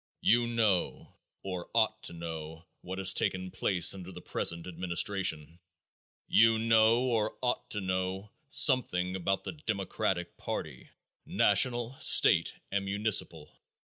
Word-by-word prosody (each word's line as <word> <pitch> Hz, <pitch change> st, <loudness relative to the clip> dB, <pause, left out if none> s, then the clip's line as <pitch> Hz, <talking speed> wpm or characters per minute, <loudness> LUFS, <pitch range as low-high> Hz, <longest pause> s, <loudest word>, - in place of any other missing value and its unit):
You 120 Hz, +1 st, +2 dB
know, 110 Hz, -6 st, -1 dB, 0.3 s
or 90 Hz, -2 st, -6 dB
ought -, -, +1 dB
to -, -, -3 dB
know, 80 Hz, -1 st, -8 dB, 0.2 s
what 95 Hz, +1 st, -7 dB
has 95 Hz, -1 st, +3 dB
taken 95 Hz, 0 st, -1 dB
place 90 Hz, -2 st, +1 dB
under 95 Hz, -1 st, -10 dB
the 90 Hz, -, -10 dB
present 85 Hz, -1 st, -3 dB
administration. 85 Hz, -2 st, -1 dB, 0.7 s
You 115 Hz, 0 st, +4 dB
know, 115 Hz, +1 st, +3 dB
or 115 Hz, -4 st, -1 dB
ought 125 Hz, -, -2 dB
to 105 Hz, -, -3 dB
know, 95 Hz, +2 st, -4 dB, 0.2 s
something 95 Hz, -11 st, +3 dB
about 95 Hz, +1 st, -2 dB
the -, -, -5 dB
democratic 100 Hz, -, -4 dB
party, -, -, -7 dB, 0.4 s
national, 120 Hz, +1 st, +1 dB
state -, -, +5 dB, 0.2 s
and 100 Hz, 0 st, -2 dB
municipal. 100 Hz, -6 st, -1 dB
95 Hz, 125 wpm, -29 LUFS, 90-110 Hz, 0.7 s, state